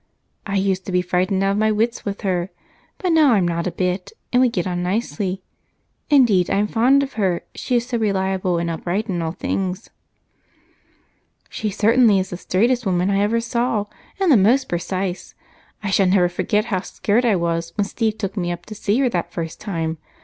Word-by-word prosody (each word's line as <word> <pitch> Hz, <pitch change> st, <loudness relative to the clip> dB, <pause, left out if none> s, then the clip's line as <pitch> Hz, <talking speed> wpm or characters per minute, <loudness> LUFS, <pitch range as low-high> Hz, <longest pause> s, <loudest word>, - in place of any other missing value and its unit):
I 200 Hz, -, -2 dB
used 190 Hz, -1 st, 0 dB
to -, -, -3 dB
be 180 Hz, 0 st, +2 dB
frightened 185 Hz, +2 st, 0 dB
out 195 Hz, -, +2 dB
of 200 Hz, -, -1 dB
my 215 Hz, 0 st, +3 dB
wits 225 Hz, +3 st, 0 dB
with 200 Hz, -1 st, -4 dB
her, 185 Hz, -3 st, -1 dB, 0.5 s
but 365 Hz, -3 st, -1 dB
now 310 Hz, -6 st, +5 dB
I'm 190 Hz, -5 st, +2 dB
not 170 Hz, +1 st, -1 dB
a -, -, -1 dB
bit, 180 Hz, +1 st, -2 dB, 0.2 s
and 250 Hz, -, +5 dB
we 255 Hz, -, +4 dB
get 180 Hz, -7 st, -2 dB
on 175 Hz, -1 st, -2 dB
nicely. 190 Hz, -1 st, -2 dB, 0.7 s
Indeed, 235 Hz, -, +4 dB
I'm 200 Hz, +1 st, +2 dB
fond 255 Hz, +6 st, +3 dB
of 270 Hz, -, -6 dB
her, 180 Hz, -3 st, 0 dB
she 250 Hz, -, -2 dB
is 240 Hz, 0 st, +1 dB
so 245 Hz, -2 st, -2 dB
reliable 190 Hz, -3 st, 0 dB
and 170 Hz, 0 st, -1 dB
upright 175 Hz, +6 st, -2 dB
in 175 Hz, -3 st, -1 dB
all 160 Hz, 0 st, -2 dB
things." 185 Hz, +2 st, -3 dB, 1.6 s
"She 215 Hz, -, -3 dB
certainly 220 Hz, +1 st, +4 dB
is 190 Hz, 0 st, -2 dB
the 180 Hz, -, -4 dB
straightest 240 Hz, +8 st, +1 dB
woman 185 Hz, -1 st, +1 dB
I 195 Hz, -, +2 dB
ever 220 Hz, +3 st, +2 dB
saw, 235 Hz, -2 st, -1 dB, 0.3 s
and 380 Hz, -4 st, +3 dB
the 260 Hz, -, +7 dB
most 245 Hz, +7 st, +3 dB
precise. 185 Hz, +1 st, -3 dB, 0.5 s
I 205 Hz, -, -2 dB
never 185 Hz, -1 st, +4 dB
shall -, -, -6 dB
forget 210 Hz, +1 st, +1 dB
how 190 Hz, -6 st, -1 dB
scared 210 Hz, +4 st, 0 dB
I 230 Hz, -4 st, +3 dB
was 170 Hz, -1 st, -1 dB
when 205 Hz, -, +2 dB
Steve 220 Hz, +1 st, -1 dB
took 195 Hz, -1 st, -4 dB
me 175 Hz, -3 st, -1 dB
up 175 Hz, 0 st, -6 dB
to 215 Hz, -, -8 dB
see 205 Hz, +1 st, 0 dB
her 260 Hz, -, +3 dB
that 175 Hz, -5 st, -2 dB
first 165 Hz, -2 st, -5 dB
time. 165 Hz, -6 st, -3 dB
195 Hz, 200 wpm, -21 LUFS, 180-225 Hz, 1.6 s, the